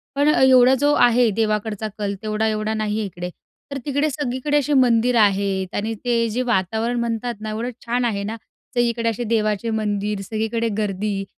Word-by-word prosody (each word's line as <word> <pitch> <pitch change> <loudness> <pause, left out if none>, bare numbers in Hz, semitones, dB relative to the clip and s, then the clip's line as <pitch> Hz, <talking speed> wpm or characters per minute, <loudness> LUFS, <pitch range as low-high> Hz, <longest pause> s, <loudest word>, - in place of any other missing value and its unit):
पण 285 +1 +2
अ, - - +2
एवढा 255 -1 +6
जो 290 +1 +3
आहे 240 -2 +4
देवाकडचा 215 -1 -1
कल, 205 -1 -2
तेवढा 215 0 -1
एवढा 215 0 -1
नाही 215 -1 -1
आहे 215 - -1
इकडे. 180 -2 -6 0.4
तर 280 - -3
तिकडे 285 +2 0
सगळीकडे 285 +1 -1
असे 290 +1 -1
मंदिर 245 -2 +3
आहेत 195 -2 +1
आणि 220 +2 -1
ते 235 -1 +2
जे 235 +4 -1
वातावरण 225 +3 0
म्हणतात 235 +1 -2
ना, 215 - -4
एवढं 225 +3 -3 0.2
छान 240 +1 0
आहे 200 -4 -1
ना, 215 +2 -4 0.4
तर - - +1
इकडे 235 -1 +1
असे 230 +2 -3
देवाचे 215 -1 0
मंदिर, 205 -1 -2
सगळीकडे 220 +3 -2
गर्दी 200 -1 -2
225 Hz, 185 wpm, -21 LUFS, 210-245 Hz, 0.4 s, एवढा